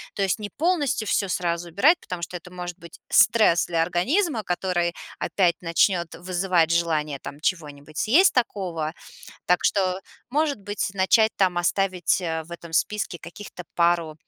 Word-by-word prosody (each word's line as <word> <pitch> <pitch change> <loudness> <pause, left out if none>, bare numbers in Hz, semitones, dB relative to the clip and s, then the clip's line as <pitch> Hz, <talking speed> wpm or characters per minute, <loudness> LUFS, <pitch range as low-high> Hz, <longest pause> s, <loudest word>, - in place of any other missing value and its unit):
То 200 - 0
есть 190 0 0
не 210 -1 -5
полностью 295 - 0
всё 200 -1 0
сразу 175 -1 -2
убирать, 270 - +4
потому 180 - -7
что 170 +1 -5
это 180 +1 -14
может 180 0 -7
быть 170 -1 -14
стресс 210 -7 +4
для 165 -1 0
организма, 230 - 0
который 175 -2 -1 0.3
опять 175 -4 +1
начнёт 175 +1 +2
вызывать 180 -2 +1
желание 155 -4 0
там 145 - -9
чего-нибудь 150 -3 -4
съесть 315 - +4
такого. 180 -10 -1 0.5
Так 180 0 +2
что, 190 -2 +1 0.3
может 290 -1 0
быть, 205 +1 -3
начать 220 +3 +3
там 185 -3 +2
оставить, 185 0 +1
э-э, 160 -3 -3
в 165 - -18
этом 170 -1 -9
списке 210 +1 -1
каких-то 180 +1 -10
пару 170 -2 +1
180 Hz, 155 wpm, -24 LUFS, 170-205 Hz, 0.5 s, убирать